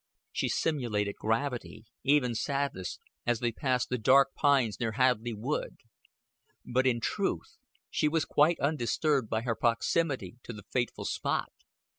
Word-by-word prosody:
She -, -, -1 dB
simulated 110 Hz, -10 st, 0 dB
gravity, 115 Hz, 0 st, -2 dB, 0.2 s
even 135 Hz, -3 st, +3 dB
sadness, 140 Hz, -, -2 dB, 0.3 s
as 120 Hz, -2 st, +2 dB
they 120 Hz, -1 st, 0 dB
passed 125 Hz, +1 st, 0 dB
the 125 Hz, -, -1 dB
dark 135 Hz, +4 st, +5 dB
pines 135 Hz, -7 st, +2 dB
near 115 Hz, -2 st, -1 dB
Hadleigh 120 Hz, -2 st, +1 dB
Wood; 130 Hz, +8 st, -3 dB, 0.9 s
but 130 Hz, +2 st, +1 dB
in 120 Hz, -2 st, +2 dB
truth 205 Hz, -, -2 dB, 0.3 s
she -, -, +2 dB
was 155 Hz, 0 st, +1 dB
quite 155 Hz, +3 st, +3 dB
undisturbed 140 Hz, -2 st, +1 dB
by 110 Hz, 0 st, 0 dB
her 120 Hz, -2 st, 0 dB
proximity 120 Hz, -, 0 dB
to 120 Hz, -, -8 dB
the 105 Hz, -2 st, -10 dB
fateful 120 Hz, -1 st, -1 dB
spot. -, -, -1 dB
125 Hz, 140 wpm, -30 LUFS, 115-140 Hz, 0.9 s, dark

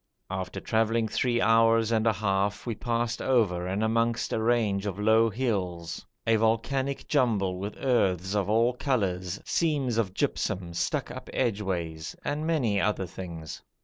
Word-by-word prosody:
After 95 Hz, -1 st, -4 dB
travelling 115 Hz, 0 st, +1 dB
three 120 Hz, +2 st, 0 dB
hours 115 Hz, 0 st, +4 dB
and 110 Hz, 0 st, +2 dB
a 110 Hz, -, +4 dB
half 100 Hz, 0 st, -1 dB
we 120 Hz, -, -1 dB
passed 120 Hz, +1 st, -2 dB
over 100 Hz, -9 st, +1 dB
and 95 Hz, +4 st, -1 dB
amongst 115 Hz, +1 st, +1 dB
a 110 Hz, -, 0 dB
range 110 Hz, -4 st, +1 dB
of 100 Hz, -2 st, -3 dB
low 110 Hz, +2 st, +4 dB
hills, 95 Hz, -8 st, -2 dB, 0.2 s
a 115 Hz, 0 st, +4 dB
volcanic 130 Hz, +5 st, 0 dB
jumble 105 Hz, -10 st, +1 dB
with 100 Hz, +2 st, -5 dB
earths 95 Hz, -8 st, +1 dB
of 100 Hz, -2 st, 0 dB
all 115 Hz, +3 st, +3 dB
colours, 100 Hz, -, -1 dB
seams 140 Hz, -8 st, +1 dB
of 100 Hz, -4 st, -1 dB
gypsum 90 Hz, -2 st, -1 dB
stuck 85 Hz, -, -1 dB
up -, -, -8 dB
edgeways, 95 Hz, -9 st, -2 dB
and 150 Hz, +2 st, -2 dB
many 120 Hz, -12 st, +1 dB
other 105 Hz, -2 st, 0 dB
things. 85 Hz, -3 st, -8 dB
110 Hz, 150 wpm, -28 LUFS, 95-120 Hz, 0.2 s, hours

